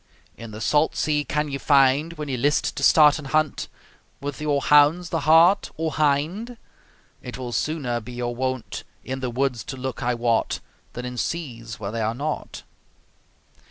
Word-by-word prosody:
In 115 - -9
the 110 +1 -9
salt 150 +7 +2
sea 150 -1 0
can 150 +1 -1
ye 140 - -3
find, 140 +3 +3
When 150 -2 -6
ye 135 - -2
list 145 +4 +1
to - - -5
start 150 -1 +6
an 150 - -9
hunt, 155 +1 0 0.5
With 145 +1 -6
your 145 -2 +1
hounds, 150 +5 +4
the 165 - 0
hart 170 +5 +6
or 160 0 -1
hind? 155 +11 0 0.6
It 125 - -7
will 125 -2 -5
sooner 130 -3 -1
be 120 +3 -10
your 120 0 -3
wont 130 -1 -3 0.2
In 130 +1 -4
the 130 -1 -3
woods 125 -2 -1
to 135 - -6
look, 130 -1 -5
I 120 0 0
wot, 115 -1 0 0.3
Than 125 - -6
in 125 0 -6
seas 115 -9 -4
where 100 -1 -4
they 115 0 -3
are 110 +1 -1
not. 150 +4 -4
140 Hz, 180 wpm, -24 LUFS, 125-155 Hz, 0.6 s, start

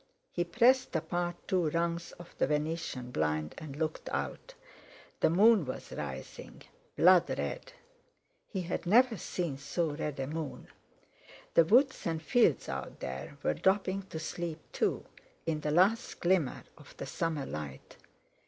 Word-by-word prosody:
He 175 - 0
pressed 245 +8 +3
apart 175 +2 -1
two 180 -5 +2
rungs 170 +1 -1
of 175 0 -13
the - - +3
venetian 150 -4 -2
blind 75 -5 -1
and 150 -3 -8
looked 155 +1 -3
out. - - -4 0.6
The - - +4
moon 205 +3 +6
was 130 -2 -6
rising, 65 -3 -7 0.3
blood 180 0 +6
red. - - -4 0.8
He 190 -4 -3
had 175 0 -3
never 240 +4 +5
seen 170 -8 -3
so 150 +3 -1
red 145 -1 -4
a 135 - -1
moon. 155 0 -5 0.8
The 165 - +6
woods 260 - +4
and 165 -1 -1
fields 165 - +3
out - - -5
there 65 +2 -6
were - - +2
dropping 190 - +1
to 160 - -6
sleep 160 0 -4
too, - - 0 0.4
in 155 -2 -1
the 150 - -1
last 185 +9 +3
glimmer 175 -7 +1 0.2
of - - -15
the - - -5
summer 160 -4 -2
light. 75 -3 -7
165 Hz, 145 wpm, -31 LUFS, 145-185 Hz, 0.8 s, moon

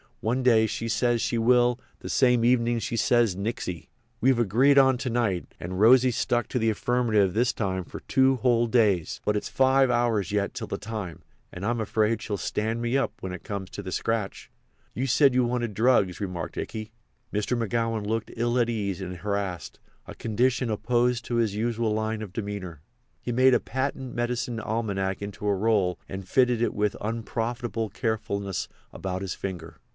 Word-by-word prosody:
One 120 +4 0
day 115 -3 +5
she 115 - -4
says 120 +1 +1
she 120 - 0
will; 120 +1 +3 0.2
the - - -7
same 125 -3 +3
evenin' 120 -1 +3
she 115 - -3
says 115 -3 +3
nixy. 95 - -4 0.3
We've 130 +1 +3
agreed 120 +6 +4
on 130 -2 +6
to 130 - -2
night, 110 -7 -1
and 90 +2 -5
Rosy's 125 +2 +5
stuck 120 -2 0
to 125 - -1
the 115 0 +2
affirmative 110 -4 +1
this 120 +3 +2
time 95 -3 -2
for - - -9
two 135 -1 +3
whole 120 -1 +2
days. 105 -8 +2
But 105 - +1
it's 105 - -2
five 130 0 +3
hours 120 -6 +1
yet 100 -1 0
till - - -5
the - - -3
time, 105 -7 -6 0.3
and 90 +2 -6
I'm 120 +2 0
afraid 110 +1 +1
she'll 105 -4 -3
stand 110 +5 -2
me 120 +3 +1
up 135 - 0
when 95 - -5
it 90 - -7
comes 100 -2 -5
to 100 - -7
the 95 - -6
scratch." 110 0 -2 0.4
"You 130 +2 -2
said 135 +1 +4
you 125 0 +3
wanted 120 -2 -1
drugs," 105 -5 +2
remarked 90 -4 -4
Ikey. 110 0 -5 0.4
Mr. 105 +4 0
McGowan 115 -1 -1
looked 115 +1 -2
ill 120 +2 +1
at 120 -1 +2
ease 100 -5 -2
and 90 -1 -5
harassed—a 100 -2 -5
condition 120 +2 0
opposed 120 +2 +1
to 120 - -2
his 115 -4 +1
usual 115 0 0
line 110 0 -2
of 95 -4 -9
demeanour. 100 -7 -5 0.4
He 120 - -3
made 130 +2 +5
a - - +3
patent 130 0 -3
medicine 120 0 -2
almanac 100 -4 -2
into 100 +1 -5
a 100 - +3
roll 100 -3 +1
and 95 -1 -6
fitted 125 -3 +3
it 120 - +1
with 105 0 0
unprofitable 115 0 -3
carefulness 100 -3 -2 0.3
about 95 -1 -4
his 95 - -3
finger. 90 -4 -6
115 Hz, 180 wpm, -26 LUFS, 100-120 Hz, 0.4 s, on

